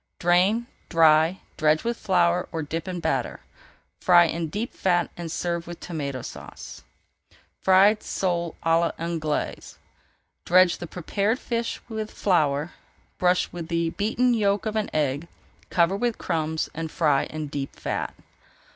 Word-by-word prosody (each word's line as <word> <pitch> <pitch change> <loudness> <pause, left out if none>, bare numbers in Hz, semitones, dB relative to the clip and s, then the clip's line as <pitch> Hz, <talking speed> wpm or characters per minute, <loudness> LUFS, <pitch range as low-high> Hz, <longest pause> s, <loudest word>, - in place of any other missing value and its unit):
Drain, 185 +7 +3 0.2
dry, 160 +1 +4 0.2
dredge 155 +2 +3
with 235 +1 -1
flour 175 -4 +1
or 160 -1 -3
dip 165 +4 -4
in 180 -1 -3
batter. - - -1 0.6
Fry 175 -1 +6
in 165 0 -2
deep 210 +9 -4
fat 175 -2 +1
and 170 -2 -6
serve 170 0 -2
with 175 0 -8
Tomato 140 -7 -4
Sauce. - - -9 0.8
FRIED 195 +3 +5
SOLE 170 -3 -2
À 165 0 +4 0.2
L'ANGLAISE 160 -3 -3 0.7
Dredge 185 0 +4
the 175 - -6
prepared 200 +7 -1
fish 235 -3 -3
with 220 -2 -4
flour, 155 -6 +1 0.5
brush 180 0 +2
with 170 -2 -6
the 170 -1 0
beaten 230 +6 +1
yolk 205 -2 +1
of 215 0 -2
an 215 -1 0
egg, 145 +1 -1 0.4
cover 170 +2 +3
with 235 +2 -1
crumbs, 160 -2 -1
and 160 0 -4
fry 150 -4 +2
in 155 -1 -5
deep 140 -1 -5
fat. - - -3
175 Hz, 140 wpm, -25 LUFS, 160-195 Hz, 0.8 s, Fry